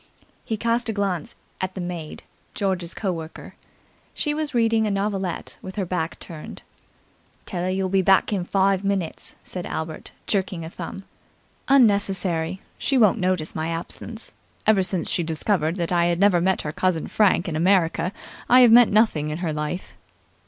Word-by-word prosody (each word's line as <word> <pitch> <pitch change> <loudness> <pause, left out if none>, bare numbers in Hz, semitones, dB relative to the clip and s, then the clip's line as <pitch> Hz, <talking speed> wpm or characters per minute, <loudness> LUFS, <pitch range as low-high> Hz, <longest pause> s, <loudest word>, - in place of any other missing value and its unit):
He 220 - -3
cast 235 +2 0
a - - 0
glance 195 -6 -2 0.3
at 185 0 -3
the - - -5
maid, 175 -3 -6 0.3
George's 185 -4 -1
co 195 -3 -1
worker. 160 -2 -8 0.6
She 295 - 0
was 300 -3 -3
reading 225 -2 +3
a - - 0
novelette 195 -3 -2
with 190 - -8
her 200 -3 -1
back 170 -2 -3
turned. 160 -3 -9 0.8
"Tell 175 -3 -4
'er - - 0
you'll 190 0 0
be 190 +1 +2
back 190 +3 +3
in 190 -3 0
five 195 +1 +1
minutes," 195 -4 -2
said 180 -1 -5
Albert, 160 0 -5 0.2
jerking 190 -4 -1
a 160 - -8
thumb. 195 - -7 0.6
"Unnecessary. 195 -8 +3 0.2
She 270 - +1
won't 220 -2 +4
notice 180 -4 0
my 160 0 -2
absence. 170 +7 -4 0.3
Ever 215 -3 +4
since 185 -2 +1
she - - 0
discovered 165 0 0
that 170 -2 -2
I 170 -1 +3
had 170 0 +1
never 195 -3 +4
met 190 +1 +1
her 150 - -3
cousin 180 -1 0
Frank 200 -4 +2
in 165 - -3
America, 170 0 +2 0.4
I 250 +1 +8
have 240 -2 +7
meant 240 0 +7
nothing 200 -9 +3
in 150 - -3
her 170 -3 -2
life." 150 +4 -4
185 Hz, 175 wpm, -23 LUFS, 170-205 Hz, 0.8 s, I